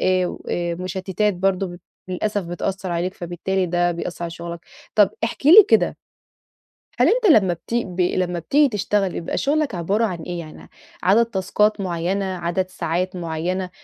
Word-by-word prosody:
آآ 185 -1 +2
و - - -7
آآ 175 -1 -1
مُشتِّتات 185 +3 -1
برضه 190 +1 0
ب 175 -1 -9 0.3
للأسف 205 +2 -2
بتأثّر 185 +2 -3
عليك 175 +3 -2
فبالتالي 180 +2 -2
ده 175 0 +1
بيأثّر 170 0 -5
على 170 - -3
شُغلك. 170 0 -7 0.3
طَب 205 -3 +5
احكِ 240 +4 -4
لي 385 +6 +10
كده - - +3 1.0
هل - - +5
أنت 485 0 +2
لمّا 190 -7 +4
بتي 235 +7 -2
ب 180 0 -3
لمّا 180 -1 0
بتيجي 290 - +3
تشتغل 205 -3 0
بيبقى 165 - -4
شُغلك 290 -5 0
عبارة 195 +7 +1
عن 180 -5 -3
إيه؟ 175 -1 -5
يعني 155 -2 -11 0.3
عدد 210 +6 +5
تاسكات 210 0 0
معيّنة، 185 +2 -1
عدد 185 0 -2
ساعات 180 +2 -2
معيّنة 175 +2 -3
185 Hz, 165 wpm, -22 LUFS, 175-200 Hz, 1.0 s, لي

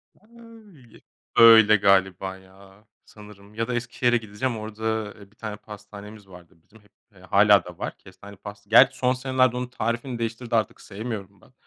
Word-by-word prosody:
Öy 220 - -19 0.3
öyle 110 -2 +8
galiba, 95 -1 +1
ya. 95 +2 -20 0.2
Sanırım 105 -1 -16
ya 115 +1 -2
da 125 - -3
Eskişehir'e 120 0 0
gideceğim. 110 +2 -4
Orada, 110 0 -4
eee, 100 0 -16
bir - - -28
tane 110 -2 -7
pastanemiz 105 0 -13
vardı 90 -1 -16
bizim. 110 +4 -22
Hep 105 - -28 0.2
eee - - -19
hâlâ - - +4
da - - -11
var. - - -6
Kestaneli 100 +2 -15
pasta 100 0 -12
gerçi 125 +4 +6
son 125 0 +1
senelerde 130 -1 0
onun 125 0 -4
tarifini 120 +1 -4
değiştirdi, 115 +1 -4
artık 110 -4 -1
sevmiyorum 100 -2 -8
ben. 130 - -23
110 Hz, 165 wpm, -24 LUFS, 100-120 Hz, 0.3 s, öyle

